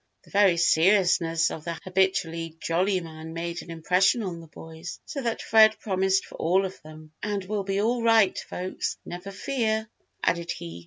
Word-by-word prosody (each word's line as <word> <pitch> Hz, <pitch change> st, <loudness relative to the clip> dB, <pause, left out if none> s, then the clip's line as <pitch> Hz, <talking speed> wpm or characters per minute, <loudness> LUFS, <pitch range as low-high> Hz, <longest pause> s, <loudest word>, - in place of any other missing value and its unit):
The -, -, -20 dB
very 195 Hz, -4 st, +4 dB
seriousness 170 Hz, -1 st, +3 dB
of 155 Hz, -, -7 dB
the 170 Hz, 0 st, -4 dB
habitually 180 Hz, -3 st, 0 dB
jolly 185 Hz, +4 st, +1 dB
man 160 Hz, -1 st, -9 dB
made 170 Hz, +1 st, -4 dB
an -, -, -13 dB
impression 180 Hz, +7 st, +2 dB
on 175 Hz, -4 st, -5 dB
the 165 Hz, -, -13 dB
boys 160 Hz, +2 st, -9 dB
so 280 Hz, -, -5 dB
that 235 Hz, -3 st, -2 dB
Fred 220 Hz, 0 st, +6 dB
promised 190 Hz, -1 st, +1 dB
for -, -, -12 dB
all 185 Hz, +4 st, +2 dB
of 190 Hz, -, -7 dB
them. 155 Hz, 0 st, -13 dB
"And 205 Hz, -2 st, -2 dB
we'll 205 Hz, +1 st, -2 dB
be 195 Hz, 0 st, -1 dB
all 240 Hz, +2 st, +1 dB
right, 225 Hz, -4 st, +4 dB
folks, 185 Hz, +1 st, -4 dB
never 180 Hz, +3 st, -7 dB
fear," 220 Hz, 0 st, -1 dB, 0.4 s
added 170 Hz, 0 st, 0 dB
he. 85 Hz, 0 st, -8 dB
185 Hz, 175 wpm, -26 LUFS, 165-205 Hz, 0.4 s, Fred